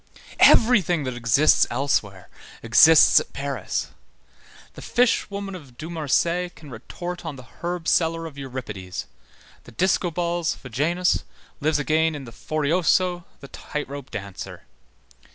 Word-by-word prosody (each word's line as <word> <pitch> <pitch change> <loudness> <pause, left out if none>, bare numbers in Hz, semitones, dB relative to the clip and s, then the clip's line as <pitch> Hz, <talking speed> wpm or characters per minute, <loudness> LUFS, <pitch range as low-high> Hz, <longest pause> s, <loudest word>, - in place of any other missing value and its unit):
Everything 190 - +5
that 130 -1 -3
exists 120 +5 +3
elsewhere 110 -7 -1 0.4
exists 155 +8 +7
at - - -9
Paris. 140 0 -3 0.8
The - - -11
fishwoman 200 -5 0
of 140 -9 -12
Dumarsais 170 +2 -1
can 150 -4 -13
retort 175 +10 -7
on 160 -4 -6
the 130 - -11 0.2
herb 175 -1 -4
seller 165 0 +1
of 160 -3 -9
Euripides, 120 -9 -7 0.6
the - - -13
discobols 175 +2 0
Vejanus 160 +9 -1 0.4
lives 155 +1 +1
again 155 +2 +1
in 145 - -7
the 120 - -10
Forioso, 170 +6 0 0.2
the 140 - -10
tight 150 -1 -6
rope 140 -1 -8
dancer. 100 -2 -8
155 Hz, 120 wpm, -23 LUFS, 130-175 Hz, 0.8 s, exists